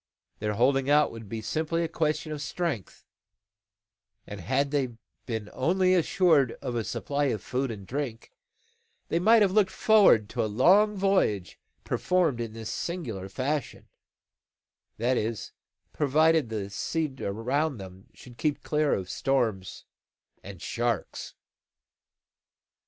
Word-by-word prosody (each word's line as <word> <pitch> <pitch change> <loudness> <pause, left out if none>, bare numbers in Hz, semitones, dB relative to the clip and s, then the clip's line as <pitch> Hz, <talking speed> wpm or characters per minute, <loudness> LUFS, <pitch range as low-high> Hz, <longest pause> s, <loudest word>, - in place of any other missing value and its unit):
Their 105 0 -2
holding 135 +4 +2
out 150 0 +4
would 115 -3 -10
be 110 0 -5
simply 160 +8 -1
a - - 0
question 155 -1 -1
of 150 -1 -4
strength; 155 - -4 1.2
and 100 -2 -8
had 135 +7 0
they 130 -5 -1 0.3
been 110 -4 -3
only 185 +7 +2
assured 165 -7 +3
of 125 - -6
a 115 -1 -1
supply 145 +6 -2
of 110 -7 -1
food 130 +1 -2
and 105 -4 -7
drink, 125 -2 -5 0.8
they 165 - +1
might 220 +4 +6
have 195 - +2
looked 200 -1 +3
forward 200 - +5
to - - -1
a 110 - -1
long 195 - +4
voyage 190 - +1 0.2
performed 170 -10 +1
in 115 -2 -5
this 110 -1 -6
singular 115 - -4
fashion: 140 +7 -3 1.1
that 120 +3 +1
is, 110 -1 -3 0.4
provided 155 -1 +3
the 100 -3 -4
sea 155 +7 -2
around 130 +8 -1
them 95 -1 -11
should 120 -2 -14
keep 150 +3 -1
clear 150 -1 +1
of 95 -2 -4
storms 115 -7 -1 0.6
and 95 -3 -10
sharks. 120 -2 -3
135 Hz, 135 wpm, -27 LUFS, 110-160 Hz, 1.2 s, might